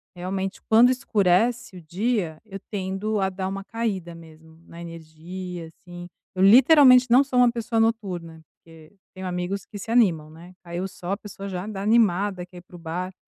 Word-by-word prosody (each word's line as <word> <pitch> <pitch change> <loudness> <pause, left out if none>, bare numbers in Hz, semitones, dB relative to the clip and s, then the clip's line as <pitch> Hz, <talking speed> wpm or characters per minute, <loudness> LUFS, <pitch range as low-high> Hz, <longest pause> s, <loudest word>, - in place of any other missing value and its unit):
Realmente, 190 +2 -4
quando 230 +3 +5
escurece 215 -2 0
o - - -11
dia, 175 -1 -2
eu 195 -2 -9
tendo 200 +2 -3
a 190 - +1
dar 190 0 -5
uma 195 +1 -5
caída 200 -6 -4
mesmo 160 -1 -16
na 170 - -11
energia, 170 +2 -8
assim. 175 +2 -12 0.3
Eu 185 - +1
literalmente 255 +3 +7
não 250 +4 +6
sou 265 -3 -1
uma 245 -1 +5
pessoa 235 -1 -2
noturna, 185 -8 -2
porque 160 0 -18 0.2
tenho 190 -1 -8
amigos 180 +2 -4
que 205 - -10
se 200 - -9
animam, 175 -11 +2
né, 170 +3 -14
caiu 175 +1 -5
o - - -3
sol, 180 -1 -8
a - - -3
pessoa 200 -1 -9
já 185 -1 -5
anda 205 -2 -6
animada, 200 -4 +1
quer 180 0 -16
ir - - -10
pro 175 0 -15
bar. 175 +3 -5
190 Hz, 185 wpm, -24 LUFS, 175-220 Hz, 0.3 s, literalmente